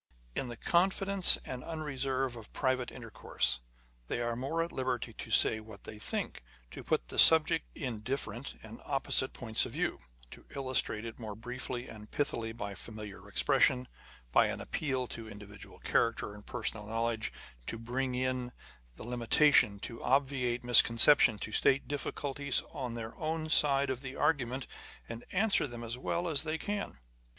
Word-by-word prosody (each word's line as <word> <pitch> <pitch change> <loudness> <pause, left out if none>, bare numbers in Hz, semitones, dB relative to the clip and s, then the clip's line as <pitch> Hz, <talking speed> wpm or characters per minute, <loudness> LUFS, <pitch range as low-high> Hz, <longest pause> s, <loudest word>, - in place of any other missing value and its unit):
In 130 - -3
the 120 -1 -8
confidence 190 +2 +4
and 125 -1 -6
unreserve 135 -5 -3
of 115 -3 -12
private 130 -2 -1
intercourse, - - 0 0.5
they - - -3
are 120 -1 -2
more 140 +7 -2
at 170 - -6
liberty 130 -3 -3
to - - -9
say 110 - +4
what 110 -2 -13
they 105 - -10
think, 105 - -5 0.3
to - - -9
put - - -1
the - - -3
subject 160 0 +6
in 125 -8 -4
different 120 +1 -4
and 110 +1 -11
opposite 135 -1 0
points 110 -3 +2
of - - -12
view, - - -2 0.3
to - - -13
illustrate 130 -5 -1
it 115 +1 -8
more 110 -3 -7
briefly 125 +2 -5
and 105 -1 -12
pithily 115 -6 -2
by 105 -3 -6
familiar 105 0 -10
expressions, 125 -1 +2 0.4
by - - +4
an - - -4
appeal 130 -4 -2
to 115 -2 -9
individual 105 -1 -12
character 115 -3 0
and 105 0 -14
personal 110 -3 -4
knowledge 115 0 -2
â€" - - -26
â€¢ - - -18
to 115 - -4
bring 125 +3 -3
in 130 -1 -2 0.4
the - - -10
limitation, 120 -1 +3
to 115 - -6
obviate 130 -3 0
misconception, 120 0 +8
to 110 - -6
state 135 +5 +3
difficulties 140 -1 -2
on 125 -2 -5
their 115 -1 -7
own 155 0 -3
side 140 -3 +4
of 130 -1 -5
the 135 -1 -7
argument, 130 -3 0 0.4
and 115 +1 -8
answer 195 -4 +2
them 120 -2 -8
as 115 0 -3
well 170 +7 -2
as 155 -4 +1
they 160 0 -3
can. 205 +3 -4
125 Hz, 165 wpm, -31 LUFS, 115-140 Hz, 0.5 s, misconception